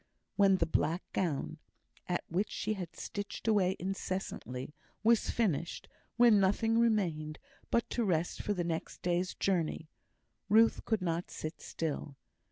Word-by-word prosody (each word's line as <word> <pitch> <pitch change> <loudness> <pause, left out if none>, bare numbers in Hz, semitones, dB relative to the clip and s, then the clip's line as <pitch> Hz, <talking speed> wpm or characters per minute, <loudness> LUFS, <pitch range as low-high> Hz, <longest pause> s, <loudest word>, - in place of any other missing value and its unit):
When 195 -2 +5
the 165 - +2
black 165 +2 0
gown, 160 -2 -1 0.5
at 175 -1 -1
which 185 +5 0
she 215 - -2
had 180 -5 -6
stitched 205 +2 -5
away 190 -4 +3
incessantly, 185 -8 -4 0.3
was 230 0 +4
finished 175 -8 -1 0.3
when 235 -3 +7
nothing 225 +4 +3
remained 170 -10 +1 0.3
but 235 - +2
to 240 - +1
rest 175 -4 0
for 205 - -1
the 175 - 0
next 165 -1 -4
day's 180 +1 0
journey 170 -4 0 0.6
Ruth 225 +2 +5
could 220 -5 0
not 170 0 -1
sit 155 +2 -6
still. 150 -3 -4
185 Hz, 140 wpm, -32 LUFS, 165-210 Hz, 0.6 s, when